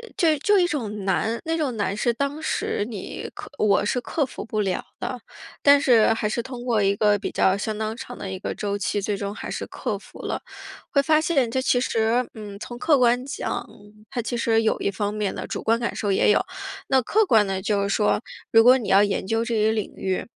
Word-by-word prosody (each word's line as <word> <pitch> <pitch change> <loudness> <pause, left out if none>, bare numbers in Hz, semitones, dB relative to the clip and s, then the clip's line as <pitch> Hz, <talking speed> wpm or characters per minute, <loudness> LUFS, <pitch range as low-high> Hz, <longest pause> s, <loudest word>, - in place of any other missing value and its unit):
就 320 -4 +3
就 410 +8 +3
一 360 - +4
种 220 - -3
难， 220 +4 0
那 325 +1 0
种 280 -6 -1
难 200 -1 -1
是 235 +3 +1
当 280 +5 -2
时 260 -8 -1
你 210 -4 -6
克 - - -8
我 205 -1 +3
是 250 - 0
克 290 +4 -1
服 - - -8
不 215 -2 -1
了 190 -2 -1 0.2
的。 250 - -4 0.4
但 285 0 +7
是 225 -4 +5
还 210 -1 -1
是 235 - -1
通 245 0 -8
过 235 -4 +1
一 200 0 +2
个 205 0 +3
比 - - -3
较 190 +1 +2
相 215 +1 -3
当 220 +1 -3
长 245 -1 -8
的 190 - -6
一 190 - -5
个 - - -4
周 205 -1 -2
期， 205 +1 -1
最 200 0 -2
终 200 +1 -4
还 - - -6
是 - - -4
克 - - -4
服 - - -15
了。 - - -3 0.5
会 280 - +4
发 310 +1 +4
现 280 -7 +1
这 260 +2 0
其 245 -1 +2
实， 230 +1 +1
嗯， 205 -2 -8
从 240 +3 -7
客 300 +2 +4
观 245 0 +3
讲， 280 - -4 0.4
它 255 -3 -2
其 240 +1 -3
实 225 -1 +2
有 220 - +1
一 - - 0
方 205 +1 -2
面 210 -2 -2
的， - - -5
主 - - -4
观 225 +1 +2
感 235 - -2
受 205 - -1
也 210 - +4
有。 - - +4 0.5
那 265 -1 +3
客 425 - +2
观 220 - +4
的， 190 -1 -2
就 200 0 0
是 200 - -1
说， 210 +1 +2 0.3
如 225 0 +8
果 255 +2 +7
你 235 - -5
要 195 +1 +6
研 200 -2 -1
究 225 +2 +1
这 235 - -3
一 215 0 +3
领 215 -2 -3
域， 190 -1 -2
225 Hz, 255 characters per minute, -24 LUFS, 205-255 Hz, 0.5 s, 如